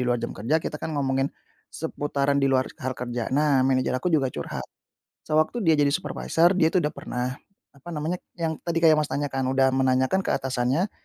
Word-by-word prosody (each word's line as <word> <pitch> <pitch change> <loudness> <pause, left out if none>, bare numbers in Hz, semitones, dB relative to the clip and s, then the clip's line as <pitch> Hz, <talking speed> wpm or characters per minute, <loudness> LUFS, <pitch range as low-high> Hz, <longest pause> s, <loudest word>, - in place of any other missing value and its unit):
luar 120 - +2
jam 120 0 -4
kerja, 125 +10 0
kita 150 -1 -4
kan 155 -2 -4
ngomongin 135 0 +1 0.4
seputaran 140 -3 -1
di 135 - +3
luar 130 -1 +1
hal 130 0 -3
kerja. 120 -1 -3
Nah, 145 0 +3
manajer 130 -1 +2
aku 130 +8 0
juga 140 -6 +1
curhat. 75 - -5 0.6
Sewaktu 155 +9 +1
dia 160 -3 +4
jadi 145 - +4
supervisor, 170 0 +1
dia 160 - +5
itu 175 0 +1
udah 150 - 0
pernah 125 +1 -4 0.3
apa 140 +4 -13
namanya, 160 +4 -2 0.2
yang 160 -3 -2
tadi 165 0 0
kayak, 155 -2 +6
Mas, 150 - 0
tanyakan, 135 -3 -2
udah 135 0 +4
menanyakan 130 +6 +2
ke - - 0
atasannya, 130 +8 0
140 Hz, 190 wpm, -25 LUFS, 130-160 Hz, 0.6 s, kayak